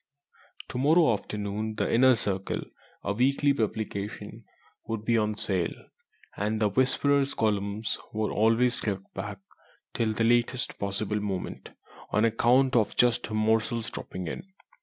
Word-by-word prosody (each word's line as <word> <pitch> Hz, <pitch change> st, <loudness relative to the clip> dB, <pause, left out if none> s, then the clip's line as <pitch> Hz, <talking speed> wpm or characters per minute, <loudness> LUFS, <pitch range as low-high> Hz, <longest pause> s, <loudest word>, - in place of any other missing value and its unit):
To 125 Hz, -, -4 dB
morrow 155 Hz, 0 st, +5 dB
afternoon 105 Hz, +1 st, -4 dB
the -, -, -1 dB
Inner 130 Hz, +2 st, +6 dB
Circle 95 Hz, -3 st, -2 dB, 0.4 s
(a 100 Hz, -, -1 dB
weekly 140 Hz, +5 st, +2 dB
publication) 110 Hz, -4 st, -4 dB, 0.4 s
would 110 Hz, -1 st, -4 dB
be 115 Hz, -, +2 dB
on 105 Hz, -1 st, +1 dB
sale, 90 Hz, -6 st, -1 dB, 0.6 s
and 105 Hz, +2 st, -1 dB
the 105 Hz, -1 st, +3 dB
"Whisperer's" 135 Hz, +4 st, +2 dB
columns 105 Hz, 0 st, -1 dB
were 110 Hz, 0 st, -1 dB
always 115 Hz, +3 st, +2 dB
kept 100 Hz, -2 st, -4 dB
back 100 Hz, -1 st, -5 dB, 0.6 s
till 110 Hz, -2 st, 0 dB
the 115 Hz, -, 0 dB
latest 120 Hz, +2 st, +1 dB
possible 100 Hz, +1 st, -2 dB
moment, 100 Hz, -3 st, -4 dB, 0.4 s
on 105 Hz, +2 st, +2 dB
account 125 Hz, +4 st, +3 dB
of 110 Hz, -4 st, +2 dB
just 120 Hz, -1 st, +4 dB
such -, -, -11 dB
morsels 110 Hz, +2 st, +1 dB
dropping 90 Hz, -1 st, -6 dB
in. 190 Hz, -, -7 dB
110 Hz, 140 wpm, -28 LUFS, 105-120 Hz, 0.6 s, Inner